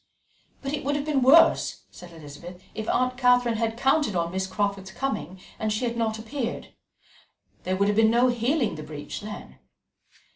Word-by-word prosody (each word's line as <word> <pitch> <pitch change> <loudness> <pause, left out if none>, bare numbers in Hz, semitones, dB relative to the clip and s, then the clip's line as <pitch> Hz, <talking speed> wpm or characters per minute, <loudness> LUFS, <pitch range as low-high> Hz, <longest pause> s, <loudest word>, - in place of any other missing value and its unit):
"But 275 +1 -3
it 295 - -3
would 285 +2 0
have 290 0 -2
been 295 -3 +1
worse," 275 +6 +5
said 175 -1 -12
Elizabeth, 165 +3 -11
"if 220 - -5
Aunt 255 0 +1
Catherine 245 -2 +3
had 225 0 -1
counted 270 -4 +2
on 170 -1 0
Miss 190 +1 -2
Crawford's 200 -1 -2
coming 190 - -4 0.2
and 215 0 -1
she 215 +4 -1
had 235 -1 -2
not 225 -2 -1
appeared. 235 +2 -5 0.9
There 185 - 0
would 200 +1 +2
have 205 0 +1
been 225 0 +5
no 240 +2 +4
healing 245 +2 0
the 155 - -7
breach 150 -1 -7
then." 210 0 -9
225 Hz, 180 wpm, -25 LUFS, 190-255 Hz, 0.9 s, worse